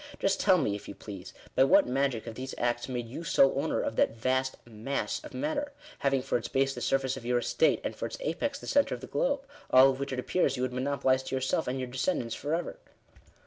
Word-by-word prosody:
Just 195 Hz, -, +1 dB
tell 190 Hz, -2 st, +5 dB
me, 135 Hz, -, 0 dB
if 100 Hz, -, -6 dB
you -, -, -7 dB
please, 100 Hz, -4 st, -9 dB, 0.2 s
by -, -, +5 dB
what 135 Hz, -, +6 dB
magic 130 Hz, -2 st, 0 dB
have 115 Hz, -, -6 dB
these 130 Hz, +3 st, -6 dB
acts 120 Hz, +1 st, -1 dB
made 120 Hz, -2 st, -3 dB
you 135 Hz, +8 st, -7 dB
sole 135 Hz, -3 st, +4 dB
owner -, -, 0 dB
of -, -, -3 dB
that -, -, +3 dB
vast 130 Hz, +2 st, 0 dB
mass 120 Hz, -, -3 dB
of 305 Hz, -, -10 dB
matter, 290 Hz, 0 st, -2 dB, 0.3 s
having 135 Hz, -2 st, +1 dB
for 130 Hz, -, 0 dB
its -, -, -6 dB
base 135 Hz, 0 st, +1 dB
the -, -, -7 dB
surface 135 Hz, -1 st, 0 dB
of 130 Hz, -, -9 dB
your 120 Hz, +1 st, +1 dB
estate, 485 Hz, -, +2 dB
and -, -, -3 dB
for -, -, -3 dB
its -, -, -7 dB
apex 290 Hz, -, -2 dB
the -, -, -11 dB
oentre 285 Hz, -, +2 dB
of 120 Hz, -, -11 dB
the -, -, -6 dB
globe? 270 Hz, -, 0 dB, 0.3 s
all 130 Hz, +1 st, +7 dB
of 130 Hz, -, -6 dB
which 140 Hz, 0 st, -3 dB
it 130 Hz, -, -3 dB
appears 135 Hz, +1 st, +1 dB
you 125 Hz, -, -1 dB
would 130 Hz, -1 st, -1 dB
monopolise 130 Hz, 0 st, +1 dB
to 130 Hz, -, -4 dB
yourself 130 Hz, +4 st, 0 dB
and 130 Hz, +2 st, -1 dB
your 130 Hz, -, -3 dB
descendants 125 Hz, -2 st, -1 dB
for 150 Hz, +3 st, -2 dB
ever. 175 Hz, -, -4 dB
130 Hz, 245 wpm, -29 LUFS, 125-145 Hz, 0.3 s, all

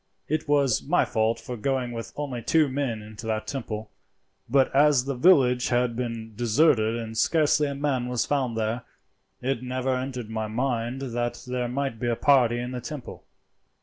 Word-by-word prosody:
It 155 Hz, 0 st, -1 dB
was 140 Hz, -5 st, +3 dB
my 175 Hz, +5 st, +2 dB
fault 110 Hz, 0 st, 0 dB
for 125 Hz, -, -6 dB
going 125 Hz, +1 st, -1 dB
with 115 Hz, -1 st, -6 dB
only 135 Hz, -5 st, -4 dB
two 155 Hz, +6 st, +3 dB
men 130 Hz, -5 st, -2 dB
into 110 Hz, +1 st, -9 dB
that 110 Hz, -1 st, -1 dB
temple; 110 Hz, -6 st, -5 dB, 0.6 s
but 135 Hz, +1 st, +3 dB
as 140 Hz, -3 st, +5 dB
the 140 Hz, -, -1 dB
village 125 Hz, -4 st, +4 dB
had 120 Hz, -1 st, +1 dB
been 115 Hz, -2 st, -4 dB
deserted 115 Hz, -1 st, +3 dB
and 115 Hz, -1 st, -5 dB
scarcely 150 Hz, +4 st, +3 dB
a 140 Hz, -, -4 dB
man 135 Hz, -3 st, -1 dB
was 125 Hz, -1 st, 0 dB
found 130 Hz, -5 st, -1 dB
there, 110 Hz, +2 st, -1 dB, 0.6 s
it 130 Hz, -2 st, -1 dB
never 130 Hz, +1 st, -1 dB
entered 125 Hz, -3 st, -4 dB
my 110 Hz, -1 st, -2 dB
mind 120 Hz, +2 st, -2 dB
that 120 Hz, -2 st, -3 dB
there 125 Hz, -1 st, -2 dB
might 135 Hz, -2 st, -3 dB
be 120 Hz, -, -2 dB
a 120 Hz, -, +1 dB
party 125 Hz, -3 st, +4 dB
in 120 Hz, +1 st, -4 dB
the 125 Hz, -1 st, -5 dB
temple." 140 Hz, 0 st, -8 dB
125 Hz, 180 wpm, -26 LUFS, 115-135 Hz, 0.6 s, as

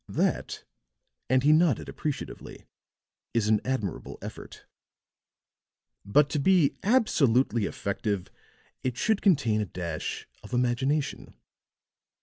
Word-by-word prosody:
That," -, -, -1 dB, 0.7 s
and 130 Hz, +1 st, +3 dB
he 150 Hz, -, +5 dB
nodded 155 Hz, -5 st, +3 dB
appreciatively, 150 Hz, -3 st, -6 dB, 0.7 s
"is 110 Hz, -2 st, +2 dB
an 110 Hz, -1 st, +3 dB
admirable 110 Hz, -9 st, -3 dB
method. -, -, -9 dB, 1.4 s
But 140 Hz, +9 st, +4 dB
to 150 Hz, -, 0 dB
be 170 Hz, -1 st, +4 dB
absolutely 135 Hz, -, +3 dB
effective 100 Hz, -1 st, -3 dB, 0.5 s
it 125 Hz, -2 st, -2 dB
should 220 Hz, -, +1 dB
contain 130 Hz, -, +3 dB
a -, -, -1 dB
dash 85 Hz, -3 st, -5 dB
of -, -, -12 dB
imagination. 130 Hz, +4 st, 0 dB
130 Hz, 105 wpm, -27 LUFS, 105-150 Hz, 1.4 s, he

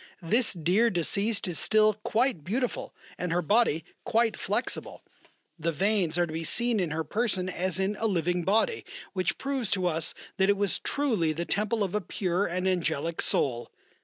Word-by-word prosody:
"This 225 Hz, +8 st, +2 dB
dear 185 Hz, +7 st, +2 dB
deceased 200 Hz, +4 st, 0 dB
is 170 Hz, -4 st, -2 dB
still 215 Hz, 0 st, +4 dB
quite 215 Hz, -, 0 dB
beautiful 240 Hz, -, -2 dB, 0.3 s
and 180 Hz, -1 st, -2 dB
her 175 Hz, +1 st, +1 dB
body 165 Hz, -4 st, +2 dB, 0.2 s
quite 230 Hz, 0 st, +2 dB
flexible, -, -, -3 dB, 0.6 s
the 165 Hz, +2 st, 0 dB
veins 180 Hz, 0 st, +1 dB
are 175 Hz, -, +3 dB
to 155 Hz, -, -8 dB
be 165 Hz, +1 st, -3 dB
seen 235 Hz, +6 st, +2 dB
in 180 Hz, -4 st, 0 dB
her 160 Hz, +2 st, -2 dB
person 200 Hz, 0 st, 0 dB
as 185 Hz, -1 st, -1 dB
in 195 Hz, +2 st, 0 dB
a 225 Hz, -, +1 dB
living 175 Hz, -2 st, 0 dB
body, 225 Hz, -, +1 dB, 0.3 s
which 185 Hz, -3 st, 0 dB
proves 270 Hz, -6 st, -1 dB
to 185 Hz, -2 st, +1 dB
us 160 Hz, -2 st, 0 dB, 0.2 s
that 190 Hz, 0 st, +3 dB
it 200 Hz, -, +3 dB
was 200 Hz, -2 st, 0 dB
truly 220 Hz, -, 0 dB
the 170 Hz, +3 st, -3 dB
temple 210 Hz, +3 st, 0 dB
of 190 Hz, -, -3 dB
a 210 Hz, -, 0 dB
pure 185 Hz, +1 st, -1 dB
and 180 Hz, +2 st, -2 dB
angelic 165 Hz, -3 st, -1 dB
soul. 120 Hz, -3 st, 0 dB
190 Hz, 180 wpm, -28 LUFS, 170-215 Hz, 0.6 s, still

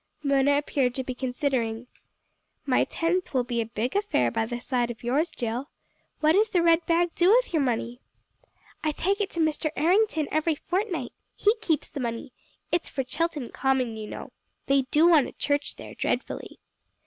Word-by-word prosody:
Mona 280 Hz, 0 st, +3 dB
appeared 270 Hz, -4 st, 0 dB
to 260 Hz, -, -2 dB
be 255 Hz, -, -4 dB
considering. 250 Hz, -3 st, -2 dB, 0.8 s
"My 260 Hz, -3 st, +3 dB
tenth 335 Hz, -1 st, -1 dB
will 255 Hz, -, +3 dB
be 240 Hz, -1 st, -1 dB
a 225 Hz, -, -4 dB
big 230 Hz, -, -3 dB
affair 400 Hz, -, +1 dB
by 225 Hz, -, -1 dB
the 240 Hz, 0 st, -4 dB
side 245 Hz, -1 st, -1 dB
of 235 Hz, -1 st, -8 dB
yours, 285 Hz, +8 st, +1 dB
Jill. 240 Hz, +4 st, -4 dB, 0.5 s
What 310 Hz, 0 st, +5 dB
does 420 Hz, +6 st, +4 dB
the 360 Hz, -5 st, +2 dB
red 335 Hz, 0 st, +4 dB
bag 340 Hz, 0 st, +2 dB
do 355 Hz, +1 st, +3 dB
with -, -, +4 dB
your 315 Hz, -, +3 dB
money?" 245 Hz, -1 st, -2 dB, 0.8 s
"I 310 Hz, -1 st, +1 dB
take 395 Hz, +7 st, 0 dB
it 400 Hz, -, -1 dB
to 340 Hz, -, -3 dB
Mr. 315 Hz, 0 st, +1 dB
Errington 335 Hz, -1 st, +2 dB
every 310 Hz, +1 st, +1 dB
fortnight. 370 Hz, +5 st, -2 dB, 0.2 s
He 420 Hz, -, +3 dB
keeps 320 Hz, -8 st, 0 dB
the 285 Hz, -, -7 dB
money. 235 Hz, 0 st, -4 dB, 0.4 s
It's 345 Hz, -, 0 dB
for 270 Hz, -, -2 dB
Chilton 300 Hz, -1 st, -2 dB
Common, 260 Hz, -3 st, 0 dB
you 215 Hz, -1 st, -6 dB
know. -, -, -8 dB, 0.3 s
They 275 Hz, -1 st, +2 dB
do 310 Hz, +5 st, +5 dB
want 315 Hz, -6 st, +5 dB
a -, -, -10 dB
church 285 Hz, 0 st, -1 dB
there -, -, -10 dB
dreadfully." -, -, -3 dB
285 Hz, 185 wpm, -26 LUFS, 250-335 Hz, 0.8 s, What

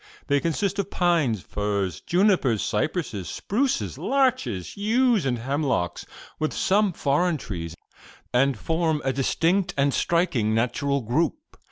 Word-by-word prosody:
They 145 Hz, -1 st, +2 dB
consist 190 Hz, +6 st, -1 dB
of 200 Hz, -1 st, -1 dB
pines, 160 Hz, -, +1 dB
firs, 100 Hz, -5 st, -2 dB
junipers, 175 Hz, -, +2 dB
cypresses, 110 Hz, -, -2 dB
spruces, 255 Hz, +6 st, -1 dB
larches, 255 Hz, -, 0 dB
yews 220 Hz, -, +2 dB
and 125 Hz, -2 st, 0 dB
hemlocks, 135 Hz, -, -1 dB, 0.3 s
with 155 Hz, 0 st, -1 dB
some 205 Hz, +1 st, +2 dB
foreign 155 Hz, +2 st, +1 dB
trees, 85 Hz, -, -6 dB, 0.6 s
and 135 Hz, +2 st, +3 dB
form 160 Hz, -2 st, 0 dB
a 135 Hz, -, +1 dB
distinct 175 Hz, +7 st, +1 dB
and 140 Hz, 0 st, +2 dB
striking 155 Hz, -11 st, +1 dB
natural 140 Hz, +4 st, 0 dB
group. 135 Hz, -, 0 dB
150 Hz, 125 wpm, -25 LUFS, 120-185 Hz, 0.6 s, and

